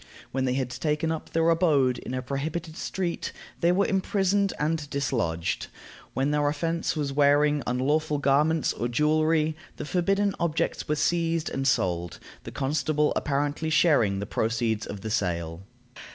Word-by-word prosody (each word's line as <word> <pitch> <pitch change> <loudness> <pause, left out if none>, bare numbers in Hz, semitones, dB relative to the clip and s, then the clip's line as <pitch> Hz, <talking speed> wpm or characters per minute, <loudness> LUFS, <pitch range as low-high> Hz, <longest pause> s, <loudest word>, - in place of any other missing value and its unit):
When 130 0 0
they 125 0 0
had 130 -2 -1
taken 150 +3 -1
up 160 - -4
their 165 0 +1
abode 145 -7 +3
in 130 - -5
a 130 - -3
prohibited 155 +5 -4
street, 175 -1 -3 0.3
they 170 - +3
were 195 +2 +3
imprisoned 195 0 +1
and 150 -1 -1
dislodged; 85 - -1 0.5
when 135 +2 +1
their 150 -1 +2
offense 165 +3 -1
was 145 -3 -2
wearing 145 +1 +4
unlawful 145 +5 +1
garments 145 +3 +2
or 120 - -2
jewelry, 155 +4 +2 0.2
the - - -6
forbidden 195 +4 +1
objects 165 0 -1
were 150 - +1
seized 165 0 0
and 135 0 -1
sold, 85 - 0 0.3
the - - -6
constable 150 +2 0
apparently 145 +2 -1
sharing 145 - +3
the 100 - -3
proceeds 110 0 -1
of 100 -1 -7
the 110 +1 -4
sale. 85 -4 -1
150 Hz, 150 wpm, -26 LUFS, 130-165 Hz, 0.5 s, wearing